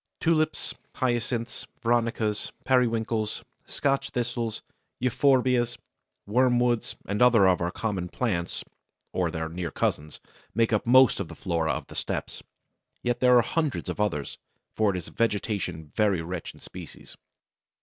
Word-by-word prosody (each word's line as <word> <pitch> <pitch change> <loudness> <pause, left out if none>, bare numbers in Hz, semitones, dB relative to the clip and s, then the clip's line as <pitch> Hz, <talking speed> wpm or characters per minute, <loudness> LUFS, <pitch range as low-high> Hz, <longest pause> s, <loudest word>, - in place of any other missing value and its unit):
_ - - -61
Tulips, 155 -2 +1 0.2
Hyacinths, 120 -2 -1 0.2
Veronicas, 115 -3 0
Periwinkles, 115 -4 +1 0.2
Scotch 140 -1 0
Thistles, 120 -2 -2 0.4
Euphorbias, 125 -1 +2 0.5
Wormwoods, 120 +1 +2
and 100 +3 -2
other 115 -6 +6
of 90 -1 +3
our 85 - +1
common 95 -2 -3
plants 90 -6 -2 0.5
or 90 -2 +1
their 80 0 -3
near 85 +1 -4
cousins, 75 +1 -2 0.4
make 115 0 +2
up 105 +3 +1
most 130 0 +6
of 100 - -3
the 85 - -10
flora 85 -3 0
of - - -4
the - - -13
Steppes. - - -3 0.6
Yet 120 0 0
there 125 -1 +6
are 120 - +5
hundreds 155 +3 -1
of - - -2
others, 85 -9 -2 0.4
for 110 -1 +3
it 95 - 0
is 85 - -6
a - - -10
vegetation 100 -8 -1
very 100 -6 +2
rich 85 +1 -5
in - - -16
species. - - -10
115 Hz, 145 wpm, -27 LUFS, 90-125 Hz, 0.6 s, other